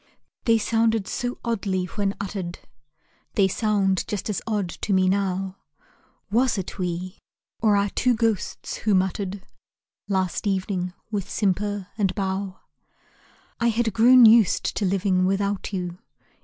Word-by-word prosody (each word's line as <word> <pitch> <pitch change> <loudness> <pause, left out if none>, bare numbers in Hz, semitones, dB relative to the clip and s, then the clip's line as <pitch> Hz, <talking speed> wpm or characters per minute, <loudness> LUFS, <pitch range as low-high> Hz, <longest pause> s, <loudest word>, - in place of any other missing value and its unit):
They 230 -1 +5
sounded 225 -1 +1
so 245 0 -3
oddly 195 -5 -1
when 200 +2 -2
uttered 190 -3 -4 0.8
They 195 -2 +4
sound 195 -2 +1
just 210 +1 -3
as 200 - -3
odd 210 -4 0
to 200 - -3
me 185 -1 +3
now; 190 0 -1 0.7
Was 240 +1 +2
it 190 +1 -5
we, 180 +1 -3 0.4
or 215 -2 +4
our 200 0 +1
two 250 -1 +2
ghosts 225 -3 -1
who 210 -2 +1
muttered 190 +1 -1 0.6
Last 190 0 -1
evening, 185 -2 -1 0.2
with 200 -4 -3
simper 205 0 -1
and 195 -2 +1
bow? 190 -1 -3 1.0
I 235 - +2
had 230 -1 +1
grown 245 +3 +7
used 220 -3 +5
to 205 - 0
living 185 -1 +1
without 200 +1 -1
you. 180 -2 -4
200 Hz, 135 wpm, -24 LUFS, 185-215 Hz, 1.0 s, grown